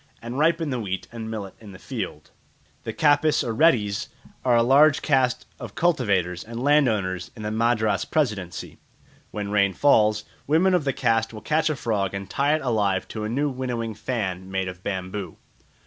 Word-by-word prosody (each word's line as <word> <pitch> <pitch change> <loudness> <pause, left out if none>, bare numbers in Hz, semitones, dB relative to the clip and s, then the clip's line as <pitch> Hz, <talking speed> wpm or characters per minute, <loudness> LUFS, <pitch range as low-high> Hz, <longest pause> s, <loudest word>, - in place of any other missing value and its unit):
And 120 +4 -5
ripen 160 -1 +2
the 125 - -1
wheat 95 -4 -4
and 115 -1 -6
millet 105 -4 -5
in 105 -3 -11
the - - -10
field." - - -6 0.5
The - - -2
Kapus 150 -1 +3
or 115 - -2
Reddis 110 -8 +2 0.4
are 125 -2 +3
a 115 - +5
large 145 +4 +5
caste 130 -4 +1
of - - -8
cultivators 100 - +1
and 115 +1 -7
landowners 110 - +1
in 110 - -8
the 105 - -2
Madras 110 -1 +1
Presidency. 105 - -2 0.5
When 105 -1 -5
rain 100 -2 +3
fails, 105 -4 +3 0.2
women 170 +6 +3
of 175 -5 +2
the 135 - +2
caste 115 -2 +1
will 110 - -8
catch 155 +1 +1
a 155 - 0
frog 100 -6 -1
and 100 0 -5
tie 140 +9 +1
it 155 - -3
alive 105 -7 0
to 110 -1 -4
a - - -3
new 140 +5 0
winnowing 120 -3 -3
fan 95 -5 -3
made 95 -1 -2
of 90 0 -7
bamboo. 95 0 -5
115 Hz, 180 wpm, -24 LUFS, 100-140 Hz, 0.5 s, a